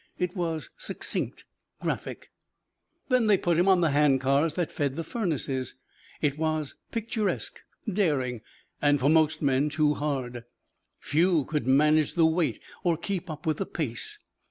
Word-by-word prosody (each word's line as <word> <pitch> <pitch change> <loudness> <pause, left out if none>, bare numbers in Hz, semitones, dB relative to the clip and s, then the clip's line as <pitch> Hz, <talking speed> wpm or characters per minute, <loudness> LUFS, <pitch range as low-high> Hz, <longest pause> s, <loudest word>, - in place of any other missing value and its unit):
It 180 +1 -2
was 165 -4 -3
succinct, - - -1 0.4
graphic. - - -4 0.8
Then 250 -3 +3
they 205 -2 +5
put 175 -2 +1
him 180 - +3
on 190 -2 +5
the 165 -3 +3
hand 145 -2 +4
cars 140 +4 +2
that 175 -3 -1
fed 140 -2 -1
the 165 - -3
furnaces. 140 - -2 0.5
It 145 -1 0
was 155 -2 -1 0.2
picturesque, 225 -2 -1 0.3
daring, 145 - 0 0.4
and 145 -1 +4
for 140 +3 +3
most 155 0 +3
men 140 +1 +2
too 150 0 +2
hard. 130 -5 -3 0.5
Few 165 -1 +2
could 150 -6 -2
manage 150 +3 +4
the 165 -2 +5
weight 160 -6 +1 0.2
or 170 -2 +2
keep 185 +1 -4
up 155 -1 -7
with 155 -2 +1
the 195 - -3
pace. 120 -8 -4
155 Hz, 155 wpm, -27 LUFS, 140-175 Hz, 0.8 s, they